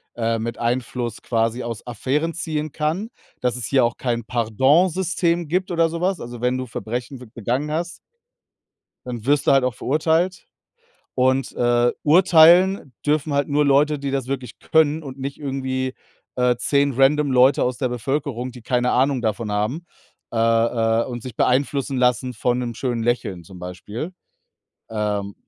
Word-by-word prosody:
äh, 115 -1 0
mit 115 +1 -4
Einfluss 120 -1 -2
quasi 115 +1 0
aus 115 -2 -6
Affären 135 +7 -1
ziehen 155 -2 -3
kann. 160 +8 -2 0.3
Dass 125 0 0
es 120 - -4
hier 135 -2 +3
auch 115 - -2
kein 120 -2 -2
Pardon-System 165 - +1
gibt 185 +3 0
oder 165 -1 +2
so 165 +1 -4
was. 185 0 0
Also, 120 0 -7
wenn 125 +1 +1
du 130 - -4
Verbrechen 120 +4 -5
be 125 - -11
begangen 120 +6 -2
hast, 170 +3 -3 1.0
dann 120 -2 -6
wirst 145 0 +2
du - - +5
halt 135 -2 +4
auch 125 -2 0
verurteilt. 160 - 0 0.7
Und, 130 +1 +1
äh, 120 0 +2
urteilen 175 0 +5
dürfen 150 0 +1
halt 140 0 +1
nur 150 +1 +2
Leute, 145 +2 +3
die 140 0 -3
das 135 -2 -2
wirklich 130 -3 -5
können 160 0 +2
und 135 -2 -9
nicht 135 +1 -5
irgendwie, 130 -2 -3 0.4
äh, 125 -1 +3
10 140 +2 +1
random 140 +3 +3
Leute 130 +2 +5
aus 125 -1 -2
der 130 - 0
Bevölkerung, 125 0 -3
die 125 - -11
keine 125 +1 +1
Ahnung 130 0 +2
davon 110 -1 -2
haben, 110 +12 -2 0.5
äh, - - -4
äh, 115 0 +2
und 120 -2 -6
sich 125 -2 -8
beeinflussen 135 +1 +1
lassen 125 0 +1
von 120 +2 0
'nem 120 -2 -3
schönen 120 -1 -2
Lächeln 115 -7 -1
zum 90 +2 -12
Beispiel, 100 - -6 0.8
ähm 105 -2 -2
130 Hz, 165 wpm, -22 LUFS, 120-150 Hz, 1.0 s, du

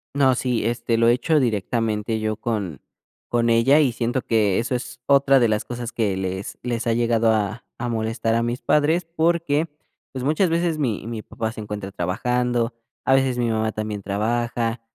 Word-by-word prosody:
No, 135 -2 +4
sí, 125 -3 -1
este, 115 0 0
lo 115 0 +4
he 120 - +6
hecho 150 +6 +2
directamente 110 -2 -1
yo 110 0 -1
con 105 - -3 0.5
con 115 -1 +2
ella, 120 +6 +5
y 140 -5 +3
siento 120 +2 -1
que 105 -4 +2
eso 120 +3 -1
es 125 0 -4
otra 140 -1 +5
de 120 - +4
las 105 -1 0
cosas 120 -1 -6
que 105 -5 0
les 95 +1 -4
les 120 -1 -2
ha 115 - +3
llegado 115 -1 +2
a 110 +1 -1
a 120 - -3
molestar 115 0 -1
a 115 - +2
mis 120 +2 -2
padres, 160 +4 +2
porque, 165 -1 +1 0.4
pues, 130 -2 -5
muchas 160 +6 +2
veces 165 -1 0
mi 120 -9 -1
mi 115 -1 -5
papá 110 +1 -4
se 110 - -8
encuentra 105 -2 -6
trabajando, 120 +6 0 0.3
a 135 - +4
veces 135 -2 +2
mi 120 -1 +1
mamá 110 0 0
también 110 -1 -4
trabaja. 115 +3 -1
115 Hz, 190 wpm, -23 LUFS, 110-130 Hz, 0.5 s, he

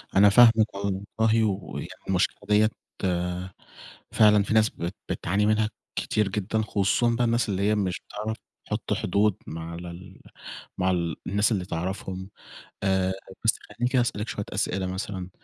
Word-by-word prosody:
أنا 100 +1 +7
فاهمِك 115 0 +6
والله، 100 0 -2 0.4
ويعني 95 -4 -3 0.2
المشكلة 95 -1 +1
ديَّة 105 +1 +5 1.4
فعلًا 105 -2 +5
في 110 - -2
ناس 110 0 +5
بت 85 +2 -5
بتعاني 100 +4 0
منها 110 0 +2 0.3
كتير 105 -2 0
جدًا، 105 +2 -1
خصوصًا 110 +3 +1
بقى 120 - +1
الناس 115 0 +1
اللي 95 -1 -1
هي 105 - +3
مش 95 -3 -1
بتعرف 110 +1 -4 0.3
تحُطّ - - -2
حدود 100 +2 +2
مع 80 +1 -6
ال 90 +2 -9 0.6
مع 95 0 +2 0.4
الناس 105 +4 +2
اللي 95 -4 0
تعرفهم. 95 +2 -4 0.5
آآ، 95 -1 +2 0.3
بس 110 - +4
خلِّيني 120 +4 -3
كده 130 -2 +4
أسأَلِك 105 -2 -2
شوية 105 - -3
أسئلة، 95 -2 -1
مثلًا 95 -1 -4
100 Hz, 145 wpm, -26 LUFS, 95-110 Hz, 1.4 s, أنا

